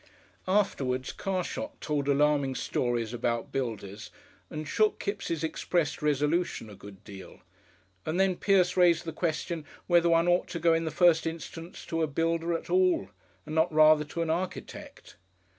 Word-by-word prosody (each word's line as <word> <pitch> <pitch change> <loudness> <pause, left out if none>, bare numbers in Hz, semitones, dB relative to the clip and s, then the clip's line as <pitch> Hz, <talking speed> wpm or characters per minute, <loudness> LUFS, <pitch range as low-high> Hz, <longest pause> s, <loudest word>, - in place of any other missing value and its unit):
Afterwards 135 -10 0
Carshot 195 - -4
told 145 -2 -2
alarming 140 -1 +2
stories 120 -3 -1
about 120 -1 -2
builders, 110 -5 -4 0.4
and 155 -1 -6
shook 215 +6 +2
Kipps' 185 -6 -3
expressed 160 0 -1
resolution 150 -4 0
a - - -11
good 100 -1 -13
deal, 100 -3 -12 0.6
and 165 +4 -2
then 190 -1 +3
Pierce 185 -1 +2
raised 175 -2 +4
the 165 - -5
question 165 0 -2 0.2
whether 170 -1 +4
one 165 +1 +3
ought 175 +1 +2
to 170 - -5
go 165 0 +4
in 165 0 0
the - - -1
first 165 -1 +3
instance 165 +1 -7
to 165 0 -2
a 160 - +2
builder 165 +3 0
at - - -12
all 365 -2 +2 0.4
and 155 - -7
not 160 +2 +2
rather 155 0 +6
to 165 +3 -3
an 160 - -1
architect. 180 +2 -6
165 Hz, 160 wpm, -28 LUFS, 145-175 Hz, 0.6 s, rather